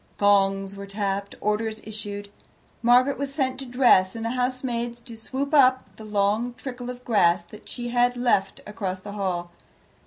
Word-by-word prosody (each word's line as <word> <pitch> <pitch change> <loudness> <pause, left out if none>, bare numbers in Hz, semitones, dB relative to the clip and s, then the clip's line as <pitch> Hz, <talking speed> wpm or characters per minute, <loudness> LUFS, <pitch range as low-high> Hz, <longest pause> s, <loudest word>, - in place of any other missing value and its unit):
Gongs 195 -1 +3
were 200 0 -8
tapped, 200 0 -3
orders 215 +1 -1
issued, 205 -1 -6 0.5
Margaret 250 +4 +4
was 280 -1 -2
sent 265 -3 -1
to 270 - -7
dress, 240 -7 +4
and 225 0 -4
the 230 - -1
housemaid 250 -1 -2
to 235 -3 -9
sweep 270 +6 -4
up 255 -8 +4
the 220 - -11
long 210 +4 0
trickle 245 -1 -7
of 250 0 -8
grass 175 -6 +3
that 210 +4 -14
she 240 -1 -5
had 245 0 +2
left 235 -6 +1
across 195 -3 -4
the 205 +2 -9
hall. 180 -4 -3
220 Hz, 165 wpm, -25 LUFS, 200-250 Hz, 0.5 s, Margaret